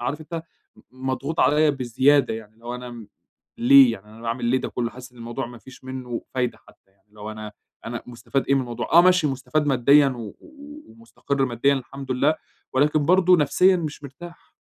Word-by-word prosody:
عارف 140 +6 -3
أنت 160 +1 -6 0.3
م 130 +1 -9
مضغوط 140 +5 -3
عليَّ 150 +1 +4
بزيادة 135 0 +2
يعني، 110 -1 -9
اللي 115 +1 -25
هو 120 +1 -5
أنا 125 0 -8
م 115 -3 -11 0.5
ليه 130 0 +7
يعني 105 -1 -9
أنا 110 +2 -15
باعمل 115 +2 -3
ليه 125 +2 +2
ده - - -4
كله؟ 120 -1 -3
حاسس 125 0 -12
إن 120 - -19
الموضوع 120 +2 -5
ما 120 -1 -11
فيش 130 +1 -16
منه 130 -2 -6
فايدة 125 -2 -1
حتى 95 - -23
يعني، 100 +2 -40
اللي 105 0 -19
هو 105 +1 -6
أنا 110 -1 -8 0.3
أنا 120 0 -5
مُستفاد 120 +2 -3
إيه 140 - +4
من 135 - +2
الموضوع؟ 120 +2 -5
آه، 170 - +9
ماشي 180 -3 +4
مُستفاد 145 +3 -1
ماديًا، 140 +2 +5
و 125 -3 -6 0.2
و 295 -1 -13
ومُستقر 185 -12 -3
ماديًا 130 +3 +1
الحمد 135 0 -6
لله، 145 +5 +2 0.4
ولكن 145 +3 +2
برضو 185 0 +5
نفسيًا 180 +5 +3
مش 155 -3 -5
مرتاح. 170 +5 -12
130 Hz, 205 wpm, -23 LUFS, 120-150 Hz, 0.5 s, آه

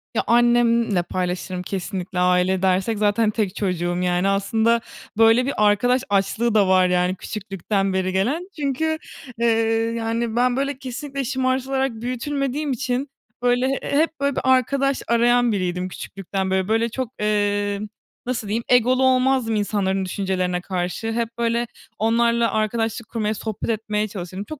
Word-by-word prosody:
Ya - - +1
annemle 235 -5 +3
paylaşırım 180 0 -3
kesinlikle, 190 -1 -4
aile 180 +1 +2
dersek 190 +4 +1
zaten 210 +1 +2
tek 205 -4 -2
çocuğum, 175 -3 -1
yani, 180 +1 +1
aslında 220 +4 +2 0.4
böyle 225 +3 +5
bir 280 - -1
arkadaş 245 +5 +3
açlığı 205 +4 +1
da 200 -3 +4
var, 185 -1 +4
yani, 180 +1 +1
küçüklükten 195 -1 -3
beri 185 0 0
gelen 275 - -1
çünkü, 305 +3 0 0.4
eee, 235 - +1 0.5
yani, 230 0 -2
ben 245 +1 +2
böyle 275 0 -1
kesinlikle 275 +2 -5
şımartılarak 265 +1 0
büyütülmediğim 275 +3 -2
için 260 +1 -2 0.3
böyle 245 +1 +2
hep 315 +2 0
böyle 280 0 0
bir - - -1
arkadaş 270 +2 +2
arayan 240 0 +3
biriydim 180 -2 -2
küçüklükten 190 0 -4
beri. 190 0 +1
Böyle 225 +2 +1
çok, 255 0 -4
eee, 205 -1 0 0.5
nasıl 245 -4 -3
diyeyim, 225 +3 -1
egolu 250 +1 +4
olmazdım 255 -3 +2
insanların 195 -2 0
düşüncelerine 185 -1 -1
karşı, 180 +4 -3
hep 230 0 -1
böyle 235 0 0 0.3
onlarla 235 +1 +2
arkadaşlık 225 +1 -1
kurmaya, 215 -2 -1
sohbet 220 0 -5
etmeye 215 -1 -1
çalışırım. 190 -1 -6
Çok 305 +5 -9
225 Hz, 140 wpm, -22 LUFS, 195-250 Hz, 0.5 s, böyle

